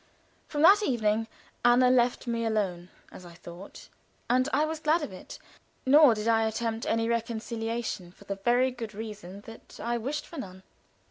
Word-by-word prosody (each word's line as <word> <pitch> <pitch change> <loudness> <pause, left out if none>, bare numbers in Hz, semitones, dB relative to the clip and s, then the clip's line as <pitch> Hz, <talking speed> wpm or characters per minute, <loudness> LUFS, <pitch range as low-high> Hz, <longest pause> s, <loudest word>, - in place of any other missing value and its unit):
From 295 0 -1
that 395 +5 +7
evening 225 - 0 0.4
Anna 245 +1 +5
let 245 0 +2
me 230 -1 -2
alone, 195 -6 -1 0.2
as - - -12
I 175 -1 -13
thought, 175 +3 -12 0.4
and 255 +3 +2
I 295 +3 +2
was 315 0 -4
glad 310 +1 +2
of 210 - -6
it, 185 - -10 0.5
nor 280 -2 +7
did 210 +1 -4
I 225 -1 +3
attempt 225 0 -3
any 225 0 +1
reconciliation, 230 -4 -3
for 195 - -18
the 200 0 -5
very 245 +5 +2
good 230 -4 -7
reason 205 -3 -8
that 225 +2 -13
I 235 0 -2
wished 285 +6 -4
for 330 - -9
none. 190 -6 -9
230 Hz, 175 wpm, -28 LUFS, 210-255 Hz, 0.5 s, that